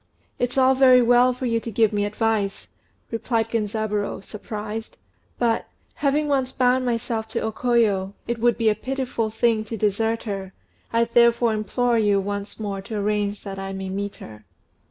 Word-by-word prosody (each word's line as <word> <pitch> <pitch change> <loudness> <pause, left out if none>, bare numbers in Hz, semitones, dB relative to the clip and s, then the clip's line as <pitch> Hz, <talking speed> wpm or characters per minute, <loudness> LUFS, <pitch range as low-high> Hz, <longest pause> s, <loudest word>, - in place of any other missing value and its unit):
"It's 245 +2 -1
all 260 0 +5
very 255 -2 +6
well 245 +1 +5
for 255 +1 -5
you 230 -1 +1
to 230 - -6
give 220 0 +2
me 205 0 +1
advice," 210 -1 -1 0.4
answered 225 0 -1
Genzaburô, 210 -2 -2
surprised; 215 +2 -6 0.4
"but, 230 -2 +1 0.3
having 295 +1 +1
once 265 -3 +1
bound 255 0 +2
myself 230 -2 -2
to 220 - -3
O 220 - -1
Koyo, 215 -5 +1
it 235 0 -2
would 240 +1 +3
be 225 -2 +3
a - - +3
pitiful 250 -1 -2
thing 225 0 +1
to 225 +1 -5
desert 220 +2 0
her; 195 -3 -5 0.4
I 230 0 +3
therefore 235 0 +3
implore 230 +3 +1
you 205 -2 +3
once 200 +2 -4
more 200 -2 -3
to 210 +3 -7
arrange 205 0 -1
that 195 -1 -6
I 195 0 -5
may 190 0 -5
meet 200 +1 -4
her." 110 0 -12
225 Hz, 175 wpm, -23 LUFS, 205-240 Hz, 0.4 s, very